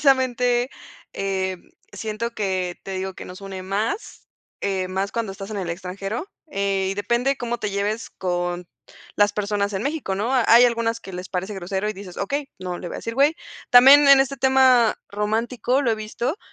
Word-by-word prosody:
precisamente, 250 -2 +2 0.4
eh, 190 -1 -2 0.4
siento 215 +3 -4
que 185 -3 -2
te 195 - -6
digo 190 0 -3
que - - -9
nos 185 +2 -10
une 190 -1 -7
más, 210 - -3 0.3
eh, 190 -2 -1
más 195 +2 -2
cuando 230 -4 -2
estás 195 +2 -8
en 210 - -3
el 180 -3 -3
extranjero, 195 - -5 0.2
eh, 195 -5 0
y - - -2
depende 235 +7 0
cómo 240 -1 -3
te 210 - -3
lleves 205 +3 -2
con 175 -1 -3 0.5
las 205 0 +4
personas 205 0 -1
en 195 +1 -2
México, 285 -8 -2
¿no?, 215 +6 -1
hay 245 -1 +6
algunas 230 -1 +1
que 190 - -10
les 180 +1 -6
parece 190 +3 -3
grosero 190 +2 -3
y - - -1
dices: 195 -3 -10
"Okey, 275 +7 -2
no 180 -1 -4
le 180 - -7
voy - - -7
a - - -4
decir 230 - -5
güey". 285 +5 +4 0.3
También 275 +4 +8
en 275 -1 +9
este 275 +1 0
tema 260 -3 +5
romántico, 230 +6 0
lo 240 - +2
he - - +2
visto 235 - -3
210 Hz, 190 wpm, -23 LUFS, 190-245 Hz, 0.5 s, en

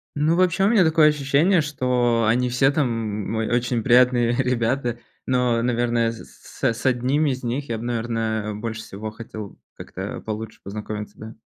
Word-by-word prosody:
Ну, 155 +3 +2
вообще, 185 +1 +2
у - - +4
меня 215 -5 +5
такое 160 -1 +5
ощущение, 150 +5 +2
что 125 -5 +1
они 125 +2 +2
все 135 +3 +3
там, 140 -3 +1 0.4
м, - - -3
ой, 110 0 -1
очень 120 -2 0
приятные 125 -1 +4
ребята. 120 -1 0 0.3
Но, 125 -2 +1
наверное, 120 -1 +1
с 115 - -14
с 115 +1 0
1 130 +4 +2
из 130 -2 -2
них 130 +4 -3
я 115 - -1
бы, 115 - -7
наверное, 115 -2 -2
больше 110 +1 -5
всего 105 +2 -7
хотел 110 -2 -9 0.2
как-то - - -7
получше 110 0 -6
познакомиться, 105 +1 -6
да. 110 0 -9
120 Hz, 165 wpm, -23 LUFS, 115-135 Hz, 0.4 s, меня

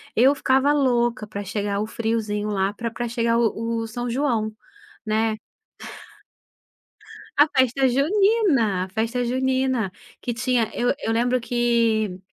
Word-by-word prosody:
eu 260 +5 +5
ficava 270 +1 +2
louca 240 -5 +1
pra 205 -1 -6
chegar 205 0 -2
o 215 - -2
friozinho 220 -2 -2
lá 195 -1 0
pra 230 +2 -4
pra 240 +1 -4
chegar 230 0 +1
o 230 0 -1
o 225 - -4
São 240 +2 -4
João, 235 -4 0 0.5
né. 215 0 0 2.0
A 295 +2 +6
festa 265 -1 +2
junina, 285 - +2
a - - -10
festa 230 +5 -1
junina, 260 -3 0 0.3
que 240 - -3
tinha, 235 0 0
eu 245 +1 +1
eu 225 - -1
lembro 245 +2 +1
que, 230 -4 +1
235 Hz, 135 wpm, -23 LUFS, 220-255 Hz, 2.0 s, A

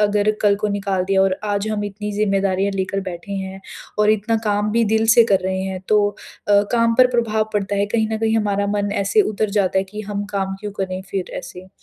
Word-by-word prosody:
अगर 210 0 +2
कल 200 -1 +4
को 210 +1 -1
निकाल 195 -2 -1
दिया 195 0 +2
और 190 -1 +1
आज 205 0 -1
हम 210 -1 -2
इतनी 210 +1 -5
ज़िम्मेदारियाँ 195 -1 +1
लेकर 195 +1 -2
बैठे 175 +2 -7
हैं 190 0 -5 0.4
और 210 0 +4
इतना 215 +2 +1
काम 210 0 +1
भी 230 0 +3
दिल 220 0 +2
से 235 - +8
कर 190 - +4
रहे 190 0 -1
हैं 190 -1 -4
तो 210 -1 +4 0.4
अ, 205 0 +5
काम 230 -1 +3
पर 255 - +8
प्रभाव 220 -2 0
पड़ता 205 -1 -1
है। 200 +1 +1
कहीं 220 +1 0
न 220 - -1
कहीं 225 0 +1
हमारा 205 -2 0
मन 205 0 -1
ऐसे 425 - +3
उतर 215 0 -1
जाता 190 -1 +2
है 190 - 0
कि 210 +3 -8
हम 205 0 -2
काम 195 -1 -1
क्यों 210 -1 -5
करें 185 0 -4
फ़िर 190 -2 -3
ऐसे? 185 +1 -10
205 Hz, 230 wpm, -20 LUFS, 195-215 Hz, 0.4 s, से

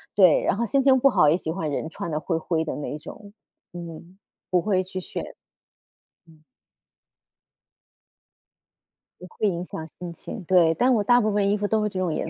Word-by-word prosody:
对。 185 -5 +6
然 - - +1
后 235 +3 -1
心 275 +5 +2
情 265 -1 +5
不 275 - +5
好 150 - +4
也 155 - +4
喜 160 - -4
欢 160 -3 -3
人 150 +2 -3
穿 170 - -6
得 150 - -1
灰 160 +2 -2
灰 165 0 -1
的 160 - -4
那 150 0 -5
种， 200 +7 -12 0.4
嗯， 170 +1 -10 0.3
不 180 -1 +2
会 190 -1 +1
去 185 0 -6
选。 - - -6 1.0
嗯。 160 -2 -21 2.8
也 180 - -10
会 210 - -2
影 175 -3 -2
响 160 - -7
心 175 +2 -9
情， 195 +4 -8
对。 170 -2 +4
但 250 +10 +2
我 215 -4 +2
大 245 +4 +4
部 215 -1 +1
分 205 -1 +1
衣 205 - +2
服 205 0 -1
都 215 0 +1
是 210 - 0
这 190 -2 -5
种 180 -4 -1
颜 - - -3
180 Hz, 210 characters per minute, -24 LUFS, 165-210 Hz, 2.8 s, 对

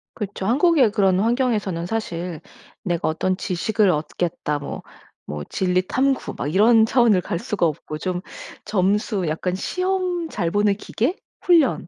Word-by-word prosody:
그쵸. 200 -3 -5
한국의 275 - +4
그런 195 -3 +3
환경에서는 215 -6 0
사실 175 -5 -4 0.5
'내가 175 -3 -1
어떤 185 +4 0
지식을 195 +2 +1
얻겠다.' 155 0 -2
뭐 140 - -6 0.5
뭐 75 0 -5
진리 185 -1 +1
탐구 270 +1 0
막 145 +3 -3
이런 220 +3 +6
차원을 230 -4 +4
갈 170 - -3
수가 190 -1 -1
없고 155 -1 -3
좀 180 +2 -3 0.4
점수 200 0 0
약간 170 +4 -2
시험 365 - -1
잘 170 - -2
보는 205 0 +2
기계, 240 - -2 0.3
훈련 320 - +3
200 Hz, 280 characters per minute, -22 LUFS, 175-235 Hz, 0.5 s, 이런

